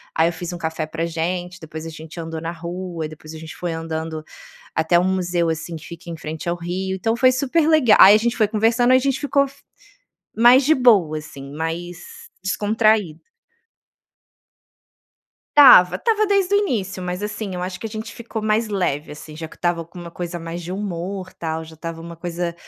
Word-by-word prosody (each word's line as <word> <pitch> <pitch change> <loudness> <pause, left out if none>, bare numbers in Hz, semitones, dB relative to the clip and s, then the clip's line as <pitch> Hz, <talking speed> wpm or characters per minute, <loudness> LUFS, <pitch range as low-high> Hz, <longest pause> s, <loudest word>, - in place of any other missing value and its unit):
aí 160 +1 +4
eu - - -5
fiz 175 +1 -6
um - - -5
café 160 -1 -3
pra 165 +1 -3
gente, 175 +2 -3
depois 160 0 -8
a - - -5
gente 160 +1 -11
andou 165 -1 -5
na 165 +1 -3
rua, 170 -1 -5
depois 155 0 -11
a 160 - -8
gente 160 0 -9
foi 175 -2 -3
andando 160 -1 -4 0.5
até 160 +2 +3
um - - +1
museu, 175 -2 0
assim, 165 +1 -4
que 155 - -13
fica 170 0 -10
em 165 - -5
frente 155 +2 -6
ao 175 - 0
rio, 185 +2 -3
então 225 +4 0
foi 255 0 +5
super 285 +5 +1
lega 290 -9 +5
aí 200 +2 +10
a - - +4
gente 235 +2 -1
foi 215 - +3
conversando 230 +4 +3
e - - +7
a - - +3
gente 270 0 0
ficou 280 -1 +2
f 275 - -16 0.8
mais 240 +4 +7
de 315 - +5
boa, 200 -12 +4
assim, 140 -2 -10
mais 165 +3 -4 0.5
descontraído. 210 -4 +1 2.4
Estava. 250 -11 +9
Estava 435 -2 +1
desde 395 -1 +2
o - - +6
início, 200 - -2
mas, 180 +2 -4
assim, 210 -2 -4
eu 180 - -4
acho 185 0 -5
que 225 - -4
a - - -5
gente 220 0 -6
ficou 235 -1 -6
mais 215 +1 +1
leve 180 -7 -1
assim 150 +1 -11
já 160 -1 -6
que - - -16
estava 175 -1 -1
com 175 +2 -14
uma 170 -1 -8
coisa 175 0 -5
mais 170 +1 -6
de 170 - -7
humor 190 -1 -4
tal, 160 -1 -4
já 160 0 -13
estava 165 +1 -7
uma 170 0 -9
coisa, 170 0 -4
175 Hz, 205 wpm, -21 LUFS, 165-215 Hz, 2.4 s, aí